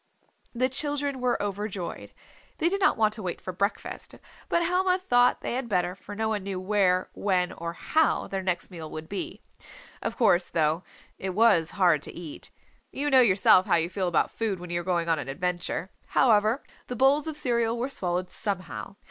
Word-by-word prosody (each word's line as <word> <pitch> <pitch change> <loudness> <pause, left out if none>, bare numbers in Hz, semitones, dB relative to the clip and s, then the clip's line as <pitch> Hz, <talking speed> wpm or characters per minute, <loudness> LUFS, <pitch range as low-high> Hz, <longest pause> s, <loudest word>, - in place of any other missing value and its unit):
The 255 +2 +2
children 285 0 0
were 250 -1 +1
overjoyed. 200 -2 -4 0.5
They 335 +1 +2
did 395 +2 -1
not 385 - +4
want 215 -1 +3
to 215 - -6
wait 180 -3 -4
for 185 - -6
breakfast. 200 +4 -3 0.3
But 340 - +2
Helma 365 +1 +2
thought 245 -9 +3
they - - -3
had 250 -1 -3
better, 180 -3 +1
for 200 +2 -10
no 220 +1 -1
one 215 -2 -1
knew 190 -1 -4
where, 185 -2 +1
when 185 -3 0
or 170 0 -5
how 315 - +1
their 195 -1 -3
next 185 0 -2
meal 160 -3 -7
would 155 +1 -7
be. 200 +1 -5 0.6
Of 225 +1 -3
course, 180 -7 +3
though, 160 +1 +1 0.4
it 190 -1 -4
was 200 -7 +4
hard 175 -6 +4
to - - -7
eat. 165 -4 -8 0.4
You 290 +1 -2
know 260 -1 +7
yourself 190 -4 +5
how - - +4
you 165 0 +1
feel 190 -2 -1
about 170 -3 +1
food 215 -5 -2
when 175 0 -8
you 175 0 0
are - - -10
going 170 -2 0
on 165 -2 +2
an - - -5
adventure. 180 +4 -3 0.2
However 220 +2 +3 0.2
the 250 - -4
bowls 275 +5 +3
of 315 - -3
cereal 235 -4 +1
were 245 +2 -1
swallowed 180 -7 -2
somehow. 195 -1 -3
200 Hz, 195 wpm, -27 LUFS, 180-245 Hz, 0.6 s, know